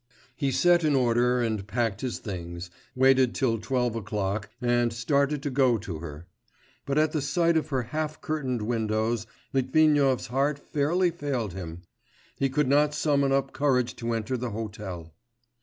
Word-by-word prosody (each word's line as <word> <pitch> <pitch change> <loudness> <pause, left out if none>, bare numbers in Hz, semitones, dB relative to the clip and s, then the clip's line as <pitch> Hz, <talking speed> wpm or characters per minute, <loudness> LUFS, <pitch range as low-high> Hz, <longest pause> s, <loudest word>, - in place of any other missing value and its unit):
He 140 -3 0
set 175 +4 +4
in 150 -2 +3
order 125 0 +3
and 110 -4 -2
packed 110 -1 -1
his 130 -3 -2
things, 85 -3 -6 0.2
waited 130 -1 +4
till 115 -4 +1
twelve 125 0 -1
o'clock, 105 -1 -2
and 120 -1 +2
started 140 +4 0
to 145 - -2
go 130 -3 +3
to 95 -6 -6
her. 80 0 -8 0.6
But 140 +1 0
at 155 0 +3
the 155 - -1
sight 165 +4 +2
of 155 -1 0
her 130 -4 0
half 155 +5 -3
curtained 130 -7 -2
windows 110 0 -1 0.3
Litvinov's 135 0 +3
heart 140 +4 0
fairly 165 +6 +1
failed 135 - -3
him... 90 -2 -7 0.6
he 135 - +2
could 140 +1 +1
not 145 +2 +3
summon 140 -3 +2
up 135 0 +1
courage 125 -4 +1
to 115 -1 -2
enter 115 +3 -2
the 125 0 -3
hotel. 100 -7 -6
125 Hz, 160 wpm, -27 LUFS, 110-140 Hz, 0.6 s, set